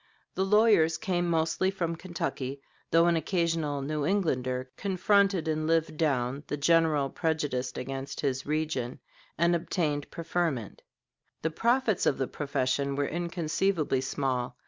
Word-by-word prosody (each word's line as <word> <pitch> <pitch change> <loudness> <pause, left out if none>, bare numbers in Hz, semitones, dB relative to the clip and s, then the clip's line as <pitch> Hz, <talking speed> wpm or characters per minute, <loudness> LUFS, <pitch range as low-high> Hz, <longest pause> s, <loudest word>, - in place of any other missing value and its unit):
The 190 - 0
lawyers 205 -5 +4
came 175 -4 -1
mostly 165 +3 +1
from 170 -4 -2
Kentucky, 150 -6 -4 0.3
though 165 +1 +5
an 170 0 +3
occasional 165 -4 0
New 150 +1 -2
Englander 130 -8 0
confronted 195 -2 +2
and 155 0 0
lived 165 -1 +1
down 140 -3 0
the 150 - -2
general 155 -2 +3
prejudice 145 -6 -1
against 135 +1 -5
his 130 -2 -1
region 150 -5 -2 0.4
and 170 +1 +3
obtained 160 -3 -1
preferment. 165 - -2 0.6
The 160 - 0
profits 235 +2 +1
of - - +2
the 135 - 0
profession 140 0 -1
were 145 0 0
inconceivably 170 -2 0
small. 130 -2 -2
160 Hz, 130 wpm, -29 LUFS, 140-175 Hz, 0.6 s, though